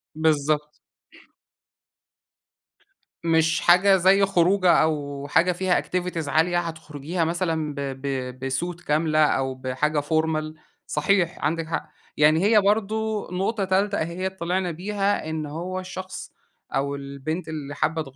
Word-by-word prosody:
بالضبط. 150 -1 +1 2.5
مش 165 0 +2
حاجة 185 +3 +6
زي 190 +2 +5
خروجة، 185 0 +3
أو 145 -3 -2
حاجة 170 +5 +3
فيها 180 +1 +1
activities 180 -4 -3
عالية، 160 +5 +2
هتخرجيها 160 0 -4
مثلًا 160 -2 -1
ب - - -6 0.2
ب 130 -1 -4
بsuit 175 +6 -3
كاملة، 155 +1 +1
أو 135 -2 0
بحاجة 130 +4 -1
formal 155 0 -1 0.3
صحيح 170 +3 +1
عندِك 165 +1 -1
حق. 160 - -3 0.3
يعني 155 +4 +4
هي 210 0 +5
برضو 215 +1 0
نقطة 195 +3 -1
تالتة 195 +2 +1
أهيّة 170 +4 -2
طلعنا 180 0 -2
بيها، 195 0 -1
إن 160 -1 -3
هو 175 +5 -4
الشخص 185 0 -7 0.4
أو 140 +1 0
البنت 140 +5 -5
اللي 145 -3 -6
حابة 160 +2 0
165 Hz, 120 wpm, -24 LUFS, 150-185 Hz, 2.5 s, حاجة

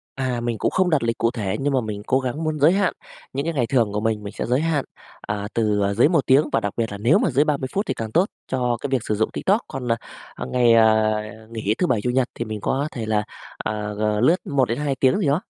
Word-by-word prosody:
À, 130 -3 -1
mình 120 -1 -2
cũng - - 0
không 185 -1 +2
đặt 155 -7 +2
lịch 115 0 -1
cụ 115 - +1
thể 105 -6 -2
nhưng 140 +1 0
mà 130 - +2
mình 105 -2 -5
cố 130 - +3
gắng 130 +4 -3
muốn 155 -1 -2
giới 150 +4 +6
hạn. 195 0 +1 0.4
Những 140 +2 -2
cái 165 - -1
ngày 125 -6 0
thường 115 -6 +1
của 105 - 0
mình, 110 -1 -1
mình 100 - -7
sẽ - - -3
giới 125 +4 +1
hạn, 160 -4 0 0.4
à, 105 0 -4
từ, 105 -3 +1
ờ, 100 0 +1
dưới 115 +7 +5
1 165 -5 +2
tiếng 140 +4 +4
và - - +2
đặc 105 -3 -3
biệt 115 -2 -1
là 100 - -5
nếu 115 +9 +3
mà - - +1
dưới 140 +3 +3
30 140 -3 0
phút 200 +2 0
thì - - -1
càng 110 -1 -5
tốt 175 - +3 0.2
cho 125 -2 0
cái - - -2
việc 130 -1 +1
sử 105 - +1
dụng 110 +2 +1
TikTok. 205 +4 +1
Còn, 130 -2 -6
à, - - +4 0.4
à, - - -5
ngày, 120 -2 +3
à, 110 -1 +4 0.3
nghỉ 110 -2 -1
Thứ 180 - +1
bảy, 115 -4 +1
Chủ 125 - -1
nhật 125 0 +2
thì 120 - -3
mình 110 -2 -5
có 140 +7 0
thể 115 -3 -5
là, 110 -1 +1 0.3
à, 105 0 -3
g 105 - -6 0.2
lướt 155 +8 +5
1 140 -3 +2
đến 115 - -1
2 145 -2 -1
tiếng 130 +3 +3
gì 185 - 0
đó. 145 +5 +2
125 Hz, 285 wpm, -22 LUFS, 110-140 Hz, 0.4 s, giới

